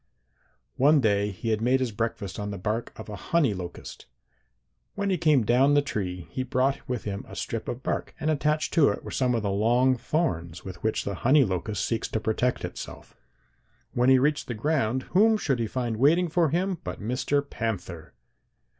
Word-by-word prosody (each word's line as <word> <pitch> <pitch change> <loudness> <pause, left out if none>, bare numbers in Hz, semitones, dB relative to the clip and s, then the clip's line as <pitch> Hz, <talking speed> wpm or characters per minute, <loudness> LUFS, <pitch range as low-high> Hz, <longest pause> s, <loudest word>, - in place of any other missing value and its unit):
"One 145 +3 +5
day 105 -4 +2
he 105 +3 -5
had 110 -1 0
made 125 +3 +3
his 130 -3 -1
breakfast 105 -3 -3
on 105 0 -3
the 100 - -5
bark 110 +5 -2
of 110 - -8
a 105 - -6
honey 155 - +1
locust. 90 -2 -8 0.9
When 200 -1 -1
he 185 - +2
came 150 -6 +4
down 130 +6 +4
the 145 - +4
tree 90 -9 -4
he 130 - -3
brought 130 +2 0
with 125 -3 -2
him 100 -1 -4
a - - -10
strip 115 - -4
of 125 +2 -5
bark, - - -3
and 155 0 0
attached 150 +1 0
to 150 -4 +5
it - - -3
were - - -7
some 125 -2 +1
of 115 - -1
the 100 - 0
long 120 +6 +3
thorns 120 - -2
with 95 -3 -8
which 110 - 0
the 100 - -3
honey 140 +3 +5
locust 95 +1 -2
seeks 115 - -1
to 110 - -2
protect 110 +3 0
itself. - - -9 0.8
When 125 +1 +3
he 130 - +7
reached 150 +3 +1
the 120 - -3
ground 130 -1 0
whom 220 +4 +5
should 135 - -1
he 115 - 0
find 120 -1 -2
waiting 165 +8 +4
for 165 -1 +2
him 180 +3 -1
but - - -5
Mr. 130 +6 -1
Panther. 90 - -5
125 Hz, 200 wpm, -26 LUFS, 105-145 Hz, 0.9 s, he